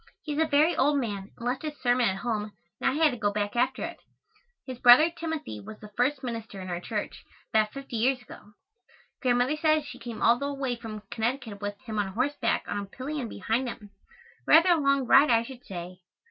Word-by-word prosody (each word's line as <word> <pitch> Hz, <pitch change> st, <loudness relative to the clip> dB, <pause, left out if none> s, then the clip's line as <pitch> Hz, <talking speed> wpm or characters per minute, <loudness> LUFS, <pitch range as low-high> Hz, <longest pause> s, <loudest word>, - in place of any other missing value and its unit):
He 300 Hz, -, -3 dB
is 295 Hz, -, -2 dB
a 320 Hz, -, +3 dB
very 310 Hz, +3 st, +3 dB
old 290 Hz, +2 st, +3 dB
man 205 Hz, -5 st, -4 dB
and 235 Hz, -, -8 dB
left 250 Hz, +1 st, -1 dB
his 300 Hz, -2 st, -5 dB
sermon 245 Hz, -2 st, +3 dB
at 190 Hz, -, -2 dB
home 210 Hz, 0 st, -3 dB, 0.3 s
and -, -, +3 dB
I -, -, -1 dB
had 310 Hz, -1 st, +4 dB
to 245 Hz, -, -5 dB
go 205 Hz, -2 st, 0 dB
back 205 Hz, +1 st, -2 dB
after 245 Hz, +2 st, +1 dB
it. -, -, -5 dB, 0.7 s
His 255 Hz, -2 st, -7 dB
brother, 250 Hz, +7 st, +8 dB
Timothy, 320 Hz, -, -5 dB
was 215 Hz, -, -10 dB
the 210 Hz, -1 st, -12 dB
first 265 Hz, +3 st, +1 dB
minister 225 Hz, -5 st, -5 dB
in 185 Hz, -1 st, -7 dB
our 175 Hz, -, -2 dB
church, 210 Hz, +3 st, -5 dB, 0.3 s
about 215 Hz, -1 st, +3 dB
fifty 275 Hz, -3 st, -6 dB
years 255 Hz, +3 st, +2 dB
ago. 210 Hz, -3 st, -14 dB, 0.7 s
Grandmother 250 Hz, +3 st, +2 dB
says 310 Hz, -1 st, +2 dB
she 290 Hz, -, -9 dB
came 230 Hz, -2 st, -6 dB
all 235 Hz, +1 st, +5 dB
the 280 Hz, 0 st, -2 dB
way 265 Hz, -3 st, -2 dB
from 220 Hz, -3 st, -8 dB
Connecticut 225 Hz, -3 st, -3 dB
with 205 Hz, 0 st, -4 dB
him 215 Hz, -1 st, -4 dB
on 195 Hz, -2 st, -2 dB
horseback 285 Hz, +7 st, 0 dB
on 205 Hz, -, -2 dB
a 200 Hz, -, -4 dB
pillion 260 Hz, +4 st, -5 dB
behind 225 Hz, +7 st, -1 dB
him. 210 Hz, -4 st, -10 dB, 0.6 s
Rather 335 Hz, +3 st, +7 dB
a 345 Hz, -2 st, +5 dB
long 275 Hz, -1 st, +2 dB
ride, 275 Hz, +4 st, +6 dB
I 230 Hz, -1 st, +4 dB
should 250 Hz, 0 st, -11 dB
say. 180 Hz, -1 st, -7 dB
245 Hz, 215 wpm, -27 LUFS, 210-275 Hz, 0.7 s, brother